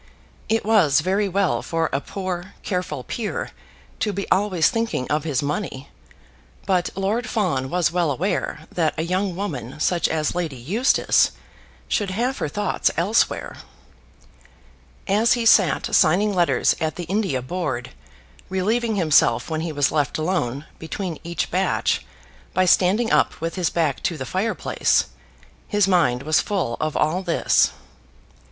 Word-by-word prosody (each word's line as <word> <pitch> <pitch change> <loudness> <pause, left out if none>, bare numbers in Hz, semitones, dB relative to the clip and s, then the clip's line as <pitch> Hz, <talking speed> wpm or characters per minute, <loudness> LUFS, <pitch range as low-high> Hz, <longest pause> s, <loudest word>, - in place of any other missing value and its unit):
It 225 -1 +1
was 180 -11 +4
very 195 +4 0
well 195 0 +1
for 165 -1 -1
a 135 - 0
poor, 185 0 -5
careful 180 -8 -3
peer 220 - -4 0.5
to 215 - 0
be 200 0 -4
always 185 -5 +3
thinking 225 - -1
of 150 +1 0
his 145 -4 0
money, 140 -3 -4 0.8
but 180 -2 +1
Lord 210 +6 -1
Fawn 160 - 0
was 175 -1 +1
well 175 -2 +1
aware 150 +1 -2
that 160 -3 0
a 160 - 0
young 185 +2 -1
woman 145 - -5
such 175 +2 +1
as 155 -1 -1
Lady 170 -5 -3
Eustace 195 - +2 0.5
should 205 -2 0
have 240 +8 -1
her - - -1
thoughts 205 +6 0
elsewhere. 195 +7 +1 1.5
As 210 +4 +3
he 240 -2 -1
sat 195 -6 +4
signing 200 +6 +4
letters 175 -2 +2
at 160 -1 -1
the 175 - -5
India 180 - -1
Board, 130 -6 -3 0.6
relieving 220 +5 0
himself 150 -7 +3
when 160 0 -1
he 165 0 -3
was 145 -2 +1
left 145 -3 0
alone 155 -5 -1
between 160 0 -5
each 170 -1 -3
batch 185 +2 0 0.5
by 185 - +3
standing 195 +6 +3
up - - +2
with 165 +1 -3
his 180 -4 0
back 160 -5 0
to 170 - -1
the 130 - -5
fire 195 +9 -1
place, - - +1 0.6
his 205 -2 +2
mind 155 -9 +2
was 155 +1 +3
full 180 - -2
of 155 -1 -1
all 160 +5 +1
this. 175 -3 +2
175 Hz, 150 wpm, -22 LUFS, 155-200 Hz, 1.5 s, was